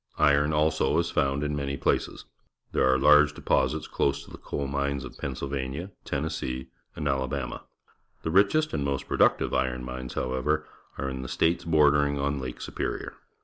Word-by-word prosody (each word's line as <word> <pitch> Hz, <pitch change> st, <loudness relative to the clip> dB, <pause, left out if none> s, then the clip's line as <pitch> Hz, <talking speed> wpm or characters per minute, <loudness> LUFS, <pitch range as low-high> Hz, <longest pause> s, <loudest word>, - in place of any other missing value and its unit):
Iron, 75 Hz, 0 st, +4 dB
also, 75 Hz, 0 st, +2 dB
is 85 Hz, 0 st, +1 dB
found 70 Hz, +1 st, +1 dB
in 75 Hz, 0 st, -1 dB
many 70 Hz, -1 st, -2 dB
places. -, -, -1 dB, 0.5 s
There 65 Hz, -, +3 dB
are 65 Hz, -, +4 dB
large 75 Hz, +2 st, +6 dB
deposits 80 Hz, -, +1 dB
close 70 Hz, 0 st, 0 dB
to -, -, -15 dB
the -, -, -10 dB
coal 70 Hz, -, -4 dB
mines 70 Hz, 0 st, -2 dB
of -, -, -10 dB
Pennsylvania, 70 Hz, +6 st, -4 dB
Tennessee, 70 Hz, -3 st, -3 dB, 0.3 s
and 75 Hz, -, -3 dB
Alabama. 65 Hz, -2 st, -2 dB, 0.6 s
The 80 Hz, -, -1 dB
richest 100 Hz, -, +3 dB
and 70 Hz, -, 0 dB
most 70 Hz, -1 st, -2 dB
productive -, -, +2 dB
iron 65 Hz, -1 st, 0 dB
mines, 65 Hz, 0 st, -6 dB
however, 75 Hz, +5 st, 0 dB, 0.3 s
are 70 Hz, -, -2 dB
in 65 Hz, -1 st, -4 dB
the 65 Hz, -, -6 dB
states 85 Hz, +1 st, +1 dB
bordering 75 Hz, -3 st, +4 dB
on 70 Hz, 0 st, -1 dB
Lake 65 Hz, -2 st, -6 dB
Superior. -, -, -4 dB
70 Hz, 165 wpm, -27 LUFS, 65-75 Hz, 0.6 s, large